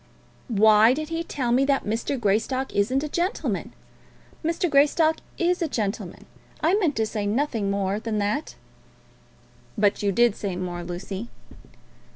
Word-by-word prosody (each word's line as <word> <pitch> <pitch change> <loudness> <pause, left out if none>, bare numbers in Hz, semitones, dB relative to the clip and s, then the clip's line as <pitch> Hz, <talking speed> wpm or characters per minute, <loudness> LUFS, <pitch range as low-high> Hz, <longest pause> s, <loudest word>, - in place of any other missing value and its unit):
"Why 220 +1 +5
did 310 +1 -4
he 330 0 -2
tell 260 -7 -2
me 255 +3 +4
that 275 -1 +1
Mr. 230 +5 -2
Greystock 235 +5 0
isn't 255 +8 +1
a - - -2
gentleman? 350 +7 -2 0.7
Mr. 335 +3 0
Greystock 310 +2 +3 0.2
is 355 0 +1
a 335 - +1
gentleman. 215 -7 -4 0.3
I 325 +4 +2
meant 360 -8 +2
to 220 - +1
say 210 -1 -3
nothing 225 -3 0
more 200 0 -1
than 220 -1 -3
that." 210 +8 -2 1.2
"But 205 -1 +2
you 200 -1 +1
did 235 +1 +3
say 195 -3 -4
more, 175 -1 -4
Lucy." 190 +5 -6
235 Hz, 150 wpm, -25 LUFS, 205-295 Hz, 1.2 s, Why